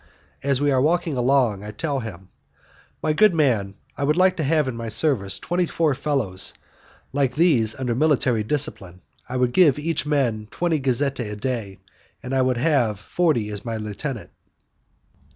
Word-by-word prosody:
As 140 Hz, -1 st, +1 dB
we 145 Hz, 0 st, +2 dB
are 130 Hz, -1 st, +2 dB
walking 165 Hz, +1 st, +1 dB
along, 125 Hz, -5 st, +2 dB
I 105 Hz, -, -7 dB
tell 140 Hz, +6 st, -2 dB
him, 95 Hz, -6 st, -8 dB, 0.7 s
"My 155 Hz, -, +1 dB
good 195 Hz, +3 st, +4 dB
man, 115 Hz, -11 st, +1 dB, 0.2 s
I -, -, -4 dB
would 150 Hz, +3 st, +1 dB
like 185 Hz, 0 st, +4 dB
to 160 Hz, -, -1 dB
have 150 Hz, 0 st, +2 dB
in 130 Hz, -, -3 dB
my 115 Hz, -1 st, -5 dB
service 110 Hz, -, +1 dB
twenty 175 Hz, 0 st, -1 dB
four 160 Hz, -3 st, +1 dB
fellows 130 Hz, -10 st, -1 dB, 0.6 s
like 135 Hz, -3 st, 0 dB
these 135 Hz, -10 st, +3 dB
under 125 Hz, -3 st, -2 dB
military 130 Hz, -4 st, +2 dB
discipline. 105 Hz, -, -1 dB, 0.3 s
I 130 Hz, -, -3 dB
would 125 Hz, -1 st, +1 dB
give 155 Hz, -7 st, +5 dB
each 160 Hz, +1 st, -1 dB
man 120 Hz, -8 st, 0 dB
twenty 170 Hz, +1 st, -1 dB
gazzette 135 Hz, +1 st, 0 dB
a 105 Hz, -3 st, -3 dB
day, 105 Hz, -3 st, -4 dB, 0.5 s
and 125 Hz, -, -5 dB
you 130 Hz, -1 st, +2 dB
would 130 Hz, -1 st, +1 dB
have 125 Hz, -7 st, +1 dB
forty 130 Hz, -3 st, 0 dB
as 105 Hz, -1 st, -5 dB
my 115 Hz, -2 st, -4 dB
lieutenant." 110 Hz, +4 st, -5 dB
130 Hz, 170 wpm, -23 LUFS, 110-150 Hz, 0.7 s, give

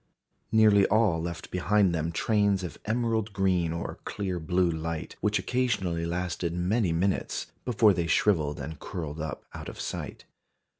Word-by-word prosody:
Nearly 105 Hz, -3 st, +6 dB
all 105 Hz, -6 st, +3 dB
left 85 Hz, 0 st, -5 dB
behind 95 Hz, +1 st, +2 dB
them 80 Hz, 0 st, -1 dB
trains 100 Hz, +1 st, +2 dB
of 90 Hz, -, -6 dB
emerald 110 Hz, -1 st, 0 dB
green 90 Hz, -4 st, +1 dB
or 85 Hz, 0 st, -5 dB
clear 95 Hz, -4 st, -3 dB
blue 90 Hz, +2 st, +1 dB
light, 80 Hz, 0 st, -4 dB
which 105 Hz, 0 st, +2 dB
occasionally 100 Hz, -10 st, 0 dB
lasted 85 Hz, -1 st, -2 dB
many 90 Hz, +2 st, +1 dB
minutes, 90 Hz, +4 st, -1 dB
before 110 Hz, -4 st, +4 dB
they 85 Hz, -2 st, -1 dB
shrivelled 80 Hz, -6 st, +2 dB
and 75 Hz, +1 st, -6 dB
curled 80 Hz, -4 st, -5 dB
up 80 Hz, -, -5 dB
out -, -, -7 dB
of -, -, -10 dB
sight. -, -, -5 dB
90 Hz, 150 wpm, -28 LUFS, 85-105 Hz, -, Nearly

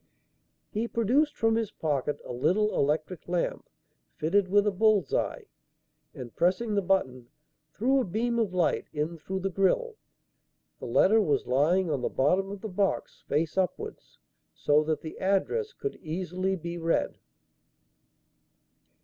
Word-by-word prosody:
He 220 Hz, +3 st, -1 dB
produced 250 Hz, +7 st, +1 dB
from 225 Hz, 0 st, +2 dB
his 225 Hz, -2 st, 0 dB
pocket 145 Hz, -2 st, -2 dB
a -, -, -6 dB
little 205 Hz, +12 st, +1 dB
electric 155 Hz, +5 st, -1 dB
lamp 175 Hz, -1 st, -2 dB, 0.5 s
fitted 185 Hz, +5 st, +1 dB
with 205 Hz, +2 st, +3 dB
a 210 Hz, -, +2 dB
bull's 200 Hz, -5 st, +2 dB
eye, -, -, -1 dB, 0.7 s
and, 120 Hz, -4 st, -9 dB
pressing 190 Hz, +6 st, +1 dB
the 200 Hz, -, +2 dB
button, 130 Hz, -11 st, 0 dB, 0.5 s
threw 265 Hz, +5 st, +2 dB
a -, -, +1 dB
beam 235 Hz, +5 st, -1 dB
of 220 Hz, -5 st, 0 dB
light 180 Hz, -3 st, 0 dB
in 155 Hz, +3 st, -2 dB
through 190 Hz, +4 st, -4 dB
the 195 Hz, +1 st, -2 dB
grille. 445 Hz, -, +1 dB, 0.8 s
The -, -, -6 dB
letter 220 Hz, +3 st, +4 dB
was 145 Hz, -9 st, +1 dB
lying 160 Hz, +7 st, +2 dB
on 140 Hz, -4 st, -1 dB
the -, -, -1 dB
bottom 185 Hz, +9 st, +1 dB
of 200 Hz, -1 st, -7 dB
the 220 Hz, -, -4 dB
box 195 Hz, 0 st, -1 dB
face 155 Hz, +5 st, 0 dB
upwards, 185 Hz, -2 st, -4 dB, 0.4 s
so 150 Hz, +1 st, +3 dB
that 155 Hz, 0 st, -1 dB
the 160 Hz, -, -8 dB
address 200 Hz, -, 0 dB
could 415 Hz, -4 st, -5 dB
easily 185 Hz, +3 st, -2 dB
be 170 Hz, 0 st, -6 dB
read. 165 Hz, 0 st, 0 dB
185 Hz, 150 wpm, -28 LUFS, 155-215 Hz, 0.8 s, letter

